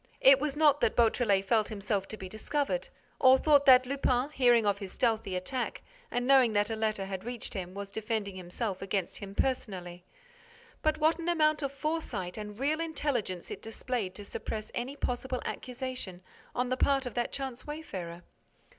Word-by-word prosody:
It 270 Hz, 0 st, +7 dB
was 295 Hz, 0 st, -1 dB
not 295 Hz, -2 st, +4 dB
that -, -, +2 dB
Beautrelet 220 Hz, -4 st, +3 dB
felt 215 Hz, +1 st, +2 dB
himself 200 Hz, -2 st, -2 dB
to 215 Hz, -, -7 dB
be 190 Hz, -, -7 dB
discovered 290 Hz, -, -2 dB, 0.3 s
or 260 Hz, 0 st, +7 dB
thought 285 Hz, 0 st, +4 dB
that 255 Hz, -1 st, +8 dB
Lupin, 270 Hz, 0 st, 0 dB
hearing 245 Hz, -5 st, +4 dB
of 200 Hz, -1 st, +2 dB
his 195 Hz, -3 st, -6 dB
stealthy 225 Hz, -5 st, 0 dB
attack 240 Hz, +8 st, -3 dB, 0.3 s
and 245 Hz, 0 st, -1 dB
knowing 260 Hz, -4 st, +5 dB
that 205 Hz, +1 st, +2 dB
a -, -, 0 dB
letter 215 Hz, -3 st, -1 dB
had 190 Hz, -1 st, -5 dB
reached 240 Hz, -1 st, -5 dB
him, 185 Hz, -1 st, -5 dB
was 200 Hz, 0 st, -6 dB
defending 215 Hz, -2 st, -3 dB
himself 185 Hz, +2 st, -4 dB
against 195 Hz, -2 st, -2 dB
him 200 Hz, 0 st, -8 dB
personally. 185 Hz, -10 st, -2 dB, 0.8 s
But 310 Hz, 0 st, +2 dB
what 315 Hz, +2 st, +3 dB
an 335 Hz, +1 st, -2 dB
amount 310 Hz, -3 st, +3 dB
of 275 Hz, -2 st, -1 dB
foresight 275 Hz, -, -3 dB
and 210 Hz, 0 st, -7 dB
real 295 Hz, +4 st, +1 dB
intelligence 280 Hz, -, -2 dB
it -, -, -6 dB
displayed 225 Hz, -3 st, -3 dB
to 205 Hz, -, -9 dB
suppress 215 Hz, +1 st, -5 dB
any 255 Hz, +4 st, -3 dB
possible 255 Hz, -1 st, -2 dB
accusation 250 Hz, -8 st, -5 dB, 0.3 s
on 250 Hz, 0 st, 0 dB
the 255 Hz, -, 0 dB
part 275 Hz, 0 st, +2 dB
of 245 Hz, -, -4 dB
that 240 Hz, -1 st, -1 dB
chance 265 Hz, -2 st, -5 dB
wayfarer! 185 Hz, -, -6 dB
240 Hz, 180 wpm, -30 LUFS, 200-270 Hz, 0.8 s, that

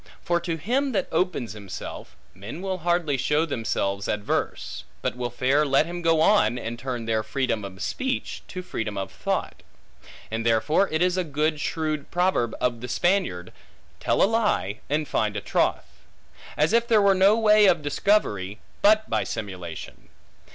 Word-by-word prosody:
For 175 Hz, 0 st, +1 dB
to 170 Hz, -1 st, -3 dB
him 255 Hz, -, 0 dB
that 190 Hz, -3 st, 0 dB
opens 160 Hz, -, -1 dB
himself, 100 Hz, -3 st, -8 dB, 0.2 s
men 110 Hz, -, -8 dB
will 190 Hz, -1 st, -2 dB
hardly 170 Hz, -4 st, +1 dB
show 150 Hz, +4 st, +1 dB
themselves 100 Hz, -7 st, -2 dB
adverse; 105 Hz, -1 st, -2 dB, 0.2 s
but -, -, -1 dB
will 125 Hz, -1 st, -3 dB
fair 130 Hz, +5 st, +2 dB
let 140 Hz, +1 st, +3 dB
him 175 Hz, +1 st, -5 dB
go 165 Hz, -2 st, +3 dB
on, 160 Hz, -, +4 dB
and 120 Hz, 0 st, -5 dB
turn 125 Hz, -2 st, -4 dB
their 110 Hz, -1 st, +1 dB
freedom 115 Hz, -1 st, -1 dB
of 95 Hz, 0 st, -7 dB
speech, 265 Hz, 0 st, -3 dB
to 185 Hz, 0 st, -6 dB
freedom 110 Hz, -, -4 dB
of 95 Hz, -, -4 dB
thought. -, -, -3 dB, 0.7 s
And 115 Hz, 0 st, -2 dB
therefore 115 Hz, -, +2 dB
it 155 Hz, +2 st, +1 dB
is 180 Hz, 0 st, +1 dB
a 185 Hz, -, +1 dB
good 150 Hz, 0 st, -1 dB
shrewd 155 Hz, -3 st, -2 dB
proverb 175 Hz, -10 st, +1 dB
of 120 Hz, -2 st, -1 dB
the 125 Hz, -, -5 dB
Spaniard, 175 Hz, -, 0 dB, 0.5 s
Tell -, -, +2 dB
a -, -, +7 dB
lie 205 Hz, -, 0 dB
and 150 Hz, +1 st, 0 dB
find 105 Hz, -4 st, 0 dB
a -, -, 0 dB
troth. -, -, 0 dB, 0.7 s
As 155 Hz, +7 st, +2 dB
if 235 Hz, 0 st, +3 dB
there 225 Hz, -2 st, +5 dB
were 200 Hz, -1 st, +5 dB
no 195 Hz, +3 st, +5 dB
way 215 Hz, -2 st, +6 dB
of 170 Hz, -5 st, +3 dB
discovery, 105 Hz, -, +1 dB, 0.2 s
but 215 Hz, +1 st, +5 dB
by -, -, 0 dB
simulation. 90 Hz, -5 st, -7 dB
150 Hz, 170 wpm, -25 LUFS, 115-185 Hz, 0.7 s, a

